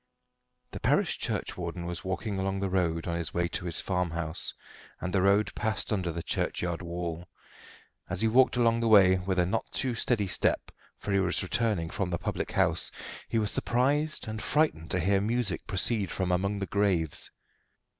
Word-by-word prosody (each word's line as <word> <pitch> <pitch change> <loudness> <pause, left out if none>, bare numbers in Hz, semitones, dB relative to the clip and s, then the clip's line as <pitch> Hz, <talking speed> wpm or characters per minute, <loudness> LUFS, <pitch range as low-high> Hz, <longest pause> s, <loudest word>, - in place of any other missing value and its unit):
The - - -6
parish - - +1
churchwarden 85 0 -3
was 85 0 -5
walking 95 +1 -3
along 95 0 -1
the 95 -1 -2
road 85 -3 0
on 85 - -1
his 85 - -4
way 85 0 +2
to 90 - -3
his 85 -1 -2
farmhouse, 85 -4 -1 0.5
and 90 - -4
the 95 - +3
road 100 +2 +3
passed 110 0 -1
under 95 -4 -1
the 85 0 -5
churchyard 85 -1 -2
wall. 85 0 -5 0.8
As - - -3
he 110 - +3
walked 125 +2 +4
along 115 -1 +3
the 115 - +1
way 95 -4 +6
with 95 +1 -2
a 90 - +4
not 90 - -2
too 130 -2 0
steady 115 -2 +1
step, 95 - 0 0.3
for 100 - -5
he 100 - +4
was 90 -1 +1
returning 95 -4 0
from 95 -3 -2
the 85 - -1
public - - -3
house - - +3 0.4
he - - 0
was 105 -2 +1
surprised 145 +4 +1
and 110 -1 -4
frightened 145 - +1
to 95 - 0
hear 95 +3 +2
music 110 -3 -1
proceed 100 +1 0
from 95 -2 -1
among 100 +3 0
the 100 - -2
graves. 95 -7 +1
95 Hz, 185 wpm, -29 LUFS, 85-110 Hz, 0.8 s, way